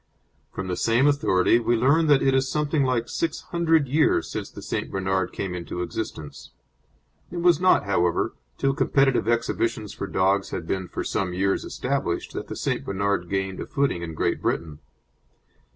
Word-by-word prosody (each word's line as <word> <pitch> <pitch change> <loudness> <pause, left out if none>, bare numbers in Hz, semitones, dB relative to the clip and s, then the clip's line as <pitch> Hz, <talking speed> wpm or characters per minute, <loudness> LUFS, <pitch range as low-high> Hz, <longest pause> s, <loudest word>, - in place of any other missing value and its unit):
From 95 - -5
the 90 - -1
same 115 +7 +2
authority 120 -7 +3
we 120 0 +1
learn 140 +8 +3
that 145 -2 +5
it 135 - +3
is 135 0 +2
something 150 0 +1
like 125 -3 0
six 165 -1 -2
hundred 165 -4 +1
years 150 +4 +2
since - - -4
the - - -11
St. - - -3
Bernard 95 -1 -1
came 95 -2 -4
into 90 0 -4
existence. 85 -4 -6 0.8
It 175 - -7
was 175 -3 +4
not, 185 - +4
however, 90 -4 +1 0.2
till 135 0 +1
competitive 135 -4 +2
exhibitions 115 -2 -1
for 100 - -5
dogs 95 +2 +1
had 85 - -5
been 95 +1 -2
for - - -4
some 90 -2 -2
years 95 +1 +1
established 130 -10 -2
that - - -5
the - - -6
St. - - -2
Bernard 100 -2 -1
gained 95 -1 -2
a - - -5
footing 140 -11 0
in 80 -2 -6
Great - - 0
Britain. 75 -3 -2
110 Hz, 175 wpm, -25 LUFS, 95-140 Hz, 0.8 s, that